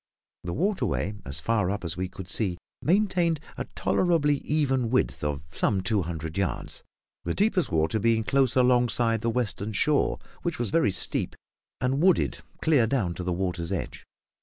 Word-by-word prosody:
The 85 - -3
waterway, 180 - 0
as 70 - -2
far 105 -5 +1
up 100 -2 -3
as 85 0 -3
we 95 +1 -2
could 95 -1 -9
see, 95 -2 0 0.2
maintained 175 -3 +2 0.2
a - - -4
tolerably 160 -5 +2
even 135 -5 0
width 130 - 0
of 75 -1 -2
some 95 +3 +1
two 100 +1 +1
hundred 80 0 -4
yards, 95 - -2 0.4
the 85 - -2
deepest 200 - +1
water 80 +5 +1
being 115 +1 +2
close 135 +1 +2
alongside 120 -3 +3
the 115 - 0
western 110 -3 -2
shore, 145 +8 +2 0.2
which 170 -2 -2
was 120 -4 -2
very 165 -11 +3
steep, 90 - -2 0.4
and 130 +3 0
wooded 185 0 +3 0.2
clear 145 -8 +4
down 110 -9 0
to 90 - -6
the 90 - -1
water's 90 -2 -2
edge. - - -4
115 Hz, 165 wpm, -27 LUFS, 90-145 Hz, 0.4 s, clear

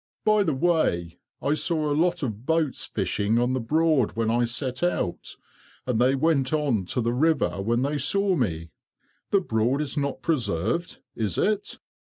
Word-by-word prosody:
By 215 -1 +4
the 160 -8 +1
way, 85 - 0 0.2
I 145 - +2
saw 155 0 0
a 145 - +1
lot 175 +2 +1
of 110 -3 -4
boats 160 -1 0
fishing 105 +3 -1
on 120 +2 +1
the 130 - 0
Broad 155 0 +2
when 115 0 0
I 120 +1 +2
set 130 +2 -3
out, 175 - -2 0.5
and 120 -2 0
they 130 +2 +4
went 135 -2 +1
on 140 -11 0
to 125 - -1
the 120 +1 0
river 145 -7 +1
when 120 +5 0
they 145 +1 -1
saw 195 +7 +2
me. 85 - -2 0.6
The 200 - +3
Broad 120 - 0
is 150 0 -3
not 140 -1 -2
preserved, 125 - -1 0.2
is 105 -5 -2
it?" 210 -1 0
135 Hz, 170 wpm, -25 LUFS, 115-160 Hz, 0.6 s, By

